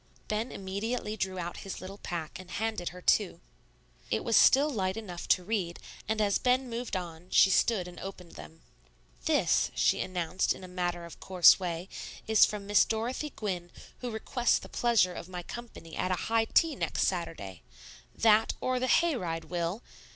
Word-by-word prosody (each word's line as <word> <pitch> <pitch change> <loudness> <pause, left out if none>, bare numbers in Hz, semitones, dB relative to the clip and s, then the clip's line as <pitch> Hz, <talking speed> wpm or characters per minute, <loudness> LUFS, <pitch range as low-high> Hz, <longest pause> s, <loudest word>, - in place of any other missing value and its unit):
Ben 215 +3 -2
immediately 210 +3 -3
drew 190 -3 -3
out 175 -1 -4
his 195 - -6
little 195 +2 -9
pack, 170 -1 -5
and 185 -1 -11
handed 215 -3 -2
her 180 0 -12
two. 205 -4 +2 0.7
It 110 - 0
was 230 - +1
still 280 +3 +6
light 195 -8 -1
enough 180 -6 -7
to 180 - +3
read; 185 -4 -2 0.3
and 220 +1 0
as 205 -2 +2
Ben 255 +1 +2
moved 235 -2 -4
on, 175 -1 -6
she 190 - +6
stood 190 -3 +2
and 175 0 -10
opened 185 -3 -8
them. 75 -2 -12 0.6
"This," - - +3
she - - +3
announced 180 0 -1
in - - -12
a - - -7
matter 175 -1 -3
of 170 - -12
course 185 -2 +6
way, 175 -1 -4 0.4
"is 220 -1 +6
from 210 -1 -5
Miss 205 0 +5
Dorothy 235 +7 -2
Gwynne, 180 -5 -3 0.3
who 250 - -4
requests 240 +2 +1
the - - -9
pleasure 225 -7 +2
of 175 - -8
my 180 -1 -6
company 225 -7 -9
at 185 - -1
a 185 - +2 0.2
high 225 0 +3
tea 320 +6 +3
next - - -1
Saturday. 160 - -3 0.5
That, 220 -1 +4
or 255 0 0
the 255 - 0
hay 335 +4 +3
ride, 165 -7 -3
Will? 175 +5 -3
190 Hz, 180 wpm, -30 LUFS, 175-225 Hz, 0.7 s, still